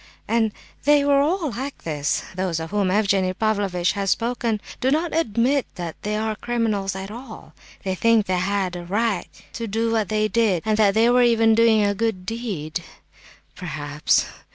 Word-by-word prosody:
And 225 Hz, -1 st, +2 dB, 0.3 s
they 290 Hz, 0 st, +4 dB
were 285 Hz, -1 st, +4 dB
all 320 Hz, 0 st, 0 dB
like 265 Hz, +5 st, -6 dB
this. 150 Hz, -3 st, -1 dB
Those 185 Hz, -3 st, -2 dB
of 160 Hz, +2 st, -6 dB
whom 205 Hz, -2 st, +1 dB
Evgenie 195 Hz, -2 st, +1 dB
Pavlovitch 200 Hz, -5 st, 0 dB
has 200 Hz, -1 st, -2 dB
spoken, 230 Hz, -1 st, 0 dB, 0.2 s
do 260 Hz, -, +1 dB
not 315 Hz, +4 st, 0 dB
admit 260 Hz, -2 st, +1 dB
that 170 Hz, -2 st, -5 dB
they 210 Hz, +1 st, -2 dB
are 220 Hz, 0 st, -1 dB
criminals 215 Hz, -5 st, -1 dB
at 190 Hz, +1 st, -6 dB
all; 235 Hz, 0 st, -10 dB, 0.3 s
they 190 Hz, -1 st, -1 dB
think 225 Hz, +2 st, +3 dB
they 185 Hz, -1 st, 0 dB
had 190 Hz, -1 st, -1 dB
a 175 Hz, -, -6 dB
right 205 Hz, +2 st, -1 dB, 0.3 s
to 230 Hz, -1 st, -4 dB
do 225 Hz, +2 st, 0 dB
what 220 Hz, -3 st, 0 dB
they 215 Hz, 0 st, +1 dB
did, 210 Hz, -5 st, +1 dB
and 215 Hz, -1 st, +2 dB
that 205 Hz, -2 st, +4 dB
they 230 Hz, +2 st, +4 dB
were 250 Hz, 0 st, +5 dB
even 225 Hz, -2 st, +4 dB
doing 225 Hz, -1 st, +4 dB
a 205 Hz, 0 st, +2 dB
good 205 Hz, -3 st, -2 dB
deed, 185 Hz, -8 st, -4 dB, 0.7 s
perhaps. 150 Hz, -4 st, 0 dB
215 Hz, 175 wpm, -23 LUFS, 190-230 Hz, 0.7 s, were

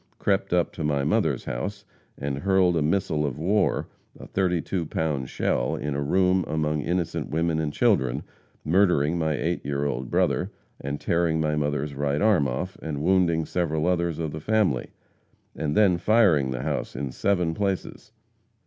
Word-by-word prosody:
crept 100 Hz, -1 st, 0 dB
up 90 Hz, -1 st, +1 dB
to 80 Hz, -, -5 dB
my 70 Hz, -2 st, +1 dB
mother's 70 Hz, -, +1 dB
house 100 Hz, +12 st, -4 dB, 0.3 s
and 70 Hz, 0 st, -3 dB
hurled 95 Hz, 0 st, +3 dB
a 80 Hz, -, +1 dB
missile 80 Hz, -1 st, 0 dB
of 70 Hz, -4 st, -2 dB
war 95 Hz, +7 st, +1 dB, 0.3 s
(a -, -, -9 dB
32 90 Hz, -1 st, -1 dB
pound 75 Hz, -5 st, -2 dB
shell) -, -, 0 dB
in 75 Hz, 0 st, -3 dB
a 70 Hz, -, -2 dB
room 90 Hz, +5 st, +2 dB
among 75 Hz, -1 st, -1 dB
innocent 85 Hz, +2 st, -2 dB
women 80 Hz, +1 st, 0 dB
and 75 Hz, -2 st, -1 dB
children, 65 Hz, -3 st, +1 dB, 0.4 s
murdering 85 Hz, -3 st, +3 dB
my 80 Hz, -1 st, +1 dB
eight 85 Hz, +5 st, -2 dB
year 70 Hz, 0 st, -2 dB
old 65 Hz, -3 st, -3 dB
brother -, -, +1 dB, 0.3 s
and 70 Hz, +1 st, -4 dB
tearing 85 Hz, -1 st, +1 dB
my 75 Hz, -1 st, +1 dB
mother's 75 Hz, -1 st, -1 dB
right 70 Hz, +4 st, -1 dB
arm 100 Hz, -10 st, +4 dB
off, 65 Hz, +10 st, -4 dB
and 75 Hz, -2 st, -4 dB
wounding 85 Hz, -3 st, +2 dB
several 80 Hz, -3 st, -1 dB
others 85 Hz, -2 st, 0 dB
of 80 Hz, -2 st, -3 dB
the 80 Hz, -, -6 dB
family, 100 Hz, -, +1 dB, 0.7 s
and 75 Hz, -1 st, -2 dB
then 95 Hz, -5 st, +4 dB
firing 95 Hz, -, +4 dB
the 65 Hz, -1 st, -3 dB
house 75 Hz, -2 st, -3 dB
in 70 Hz, 0 st, -3 dB
seven 90 Hz, 0 st, 0 dB
places. 100 Hz, 0 st, -3 dB
80 Hz, 165 wpm, -25 LUFS, 70-90 Hz, 0.7 s, arm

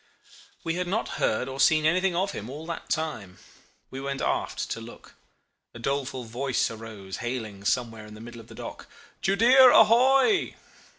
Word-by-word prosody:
"We 165 Hz, -, -1 dB
had 180 Hz, 0 st, -2 dB
not 210 Hz, +5 st, -1 dB
heard 110 Hz, -, +1 dB
or 135 Hz, 0 st, -7 dB
seen 155 Hz, +2 st, +4 dB
anything 180 Hz, +3 st, +2 dB
of 190 Hz, +3 st, 0 dB
him 110 Hz, -, -7 dB
all 150 Hz, +4 st, -8 dB
that 170 Hz, 0 st, -6 dB
time. 130 Hz, -13 st, -3 dB, 0.5 s
We 135 Hz, -, -6 dB
went 140 Hz, 0 st, -4 dB
aft -, -, -2 dB
to 115 Hz, -, -4 dB
look. 115 Hz, +1 st, -13 dB, 0.6 s
A -, -, -7 dB
doleful 135 Hz, +1 st, -2 dB
voice 125 Hz, +3 st, -1 dB
arose 110 Hz, -4 st, -8 dB
hailing 115 Hz, -5 st, -5 dB
somewhere 115 Hz, -2 st, -1 dB
in 105 Hz, -, -12 dB
the -, -, -12 dB
middle 120 Hz, 0 st, -10 dB
of -, -, -18 dB
the -, -, -13 dB
dock, -, -, -8 dB, 0.3 s
'Judea 245 Hz, +7 st, +6 dB
ahoy! 265 Hz, -, +4 dB
135 Hz, 170 wpm, -26 LUFS, 115-180 Hz, 0.6 s, Judea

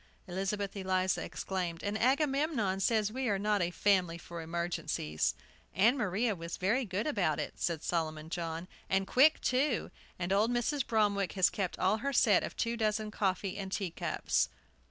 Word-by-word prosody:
Elizabeth 195 Hz, +2 st, -3 dB
Eliza 185 Hz, -1 st, 0 dB
exclaimed: 180 Hz, -3 st, -4 dB
"And 205 Hz, +1 st, -1 dB
Agamemnon 270 Hz, -, +1 dB
says 215 Hz, +1 st, +2 dB
we 260 Hz, +1 st, -2 dB
are 200 Hz, -, +2 dB
not 205 Hz, 0 st, +1 dB
a 175 Hz, -, +1 dB
family 180 Hz, -2 st, +2 dB
for 170 Hz, +1 st, -8 dB
emergencies!" 165 Hz, -, -2 dB, 0.4 s
"Ann 225 Hz, +8 st, +5 dB
Maria 215 Hz, -1 st, 0 dB
was 170 Hz, -1 st, -6 dB
very 225 Hz, +8 st, +1 dB
good 200 Hz, +1 st, -2 dB
about 190 Hz, -, +1 dB
it," -, -, -3 dB
said 165 Hz, -3 st, -1 dB
Solomon 160 Hz, -2 st, -2 dB
John; 170 Hz, 0 st, -3 dB, 0.2 s
"and 190 Hz, 0 st, +2 dB
quick, 280 Hz, +9 st, +5 dB
too. 255 Hz, -1 st, +1 dB, 0.3 s
And 180 Hz, +1 st, -1 dB
old 210 Hz, +3 st, +3 dB
Mrs. 245 Hz, +3 st, 0 dB
Bromwick 205 Hz, -4 st, +1 dB
has 190 Hz, -2 st, +3 dB
kept 190 Hz, -4 st, -2 dB
all 190 Hz, +4 st, +2 dB
her 275 Hz, +5 st, -2 dB
set 215 Hz, -5 st, +5 dB
of -, -, -6 dB
two 235 Hz, 0 st, 0 dB
dozen 215 Hz, -1 st, 0 dB
coffee 195 Hz, -1 st, -1 dB
and 195 Hz, -1 st, -5 dB
tea 195 Hz, -3 st, -2 dB
cups!" -, -, 0 dB
195 Hz, 170 wpm, -32 LUFS, 180-225 Hz, 0.4 s, Ann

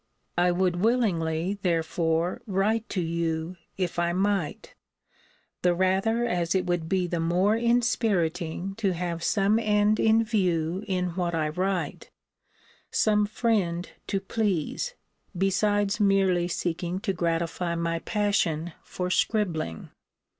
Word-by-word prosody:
I 175 Hz, +1 st, +3 dB
would 180 Hz, 0 st, +1 dB
willingly, 190 Hz, -5 st, +1 dB
therefore, 165 Hz, +2 st, 0 dB
write 210 Hz, +3 st, 0 dB
to 185 Hz, -, -1 dB
you, 165 Hz, +1 st, -2 dB, 0.2 s
if 180 Hz, -2 st, -2 dB
I 170 Hz, 0 st, +1 dB
might; 190 Hz, -4 st, -1 dB, 0.9 s
the 180 Hz, -1 st, +3 dB
rather 195 Hz, +6 st, +1 dB
as 175 Hz, -4 st, 0 dB
it 185 Hz, -1 st, +1 dB
would 175 Hz, -2 st, -1 dB
be 185 Hz, -1 st, +1 dB
the 175 Hz, -1 st, -2 dB
more 180 Hz, +6 st, +2 dB
inspiriting 200 Hz, -7 st, 0 dB
to 200 Hz, -4 st, +1 dB
have 170 Hz, -1 st, -3 dB
some 205 Hz, +4 st, +2 dB
end 210 Hz, -1 st, +2 dB
in 225 Hz, +1 st, +4 dB
view 185 Hz, -4 st, 0 dB
in 180 Hz, -2 st, 0 dB
what 170 Hz, -1 st, -2 dB
I 155 Hz, -2 st, 0 dB
write; 185 Hz, +3 st, -2 dB, 0.8 s
some 210 Hz, -1 st, +2 dB
friend 205 Hz, -6 st, 0 dB, 0.2 s
to 195 Hz, -, 0 dB
please; 205 Hz, -, -2 dB, 0.4 s
besides 205 Hz, +3 st, +1 dB
merely 195 Hz, -4 st, +3 dB
seeking 175 Hz, +1 st, -2 dB
to 195 Hz, -, -1 dB
gratify 170 Hz, 0 st, -1 dB
my 165 Hz, 0 st, -1 dB
passion 175 Hz, -6 st, 0 dB
for 180 Hz, 0 st, -4 dB
scribbling. 170 Hz, -, -1 dB
185 Hz, 125 wpm, -27 LUFS, 170-205 Hz, 0.9 s, in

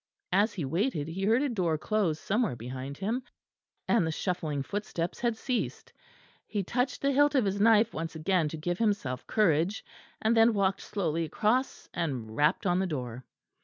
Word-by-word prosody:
As 205 Hz, +4 st, +3 dB
he 170 Hz, -7 st, -3 dB
waited 165 Hz, -, -1 dB
he 190 Hz, +4 st, -3 dB
heard 230 Hz, +6 st, +3 dB
a 290 Hz, -, +1 dB
door 180 Hz, -9 st, 0 dB
close 175 Hz, -3 st, 0 dB
somewhere 215 Hz, -, 0 dB
behind 130 Hz, +4 st, -6 dB
him, 220 Hz, +6 st, -1 dB, 0.7 s
and 230 Hz, -, +3 dB
the -, -, -1 dB
shuffling 155 Hz, -5 st, -2 dB
footsteps 175 Hz, -1 st, -3 dB
had 235 Hz, -2 st, 0 dB
ceased. 250 Hz, +1 st, -3 dB, 0.5 s
He 205 Hz, -2 st, -2 dB
touched 250 Hz, +8 st, -1 dB
the 280 Hz, -, +3 dB
hilt 290 Hz, +2 st, +4 dB
of 255 Hz, -5 st, +4 dB
his 200 Hz, +1 st, -1 dB
knife 225 Hz, 0 st, +5 dB
once 165 Hz, +1 st, -4 dB
again 160 Hz, 0 st, +1 dB
to 160 Hz, -, -6 dB
give 175 Hz, +3 st, -2 dB
himself 200 Hz, -, -1 dB
courage; 180 Hz, -1 st, +2 dB, 0.3 s
and 220 Hz, +1 st, +2 dB
then 225 Hz, 0 st, +5 dB
walked 195 Hz, -1 st, +1 dB
slowly 170 Hz, -5 st, -1 dB
across 240 Hz, -, 0 dB
and 130 Hz, -10 st, -3 dB
rapped 150 Hz, -, +2 dB
on 180 Hz, -1 st, +2 dB
the 190 Hz, -, 0 dB
door. 125 Hz, -6 st, -5 dB
190 Hz, 175 wpm, -29 LUFS, 155-220 Hz, 0.7 s, knife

